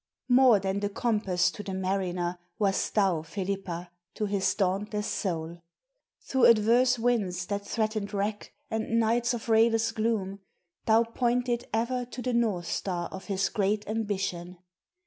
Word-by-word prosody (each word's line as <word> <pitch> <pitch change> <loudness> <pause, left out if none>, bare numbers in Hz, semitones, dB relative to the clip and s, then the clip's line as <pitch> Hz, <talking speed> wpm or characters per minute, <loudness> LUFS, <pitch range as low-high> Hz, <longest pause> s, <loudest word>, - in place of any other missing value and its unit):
MORE 250 -4 +6
than 190 +1 -1
the 205 0 -1
compass 205 -5 +1
to - - -8
the 195 -2 -5
mariner, 185 -2 -2 0.2
Wast 200 -3 0
thou, 190 -6 +3
Felipa, 180 0 -4 0.2
to 215 - -1
his 200 -1 0
dauntless 205 +2 -1
soul. 170 -4 -3 0.6
Through 265 -2 +2
adverse 235 +3 +5
winds 210 -7 0
that 200 +1 -4
threatened 215 -2 -1
wreck, 205 +1 -3 0.2
and 225 +1 0
nights 235 +2 +2
Of 235 - -7
rayless 225 0 +3
gloom, 215 -3 -1 0.5
thou 225 +1 +5
pointed 240 +1 -1
ever 240 +3 0
to 250 +1 -8
The 250 - -1
North 215 -7 +1
Star 175 -1 -3
of 190 - -8
his 195 -1 0
great 205 0 0
ambition. 195 -5 -3
205 Hz, 145 wpm, -28 LUFS, 190-230 Hz, 0.6 s, MORE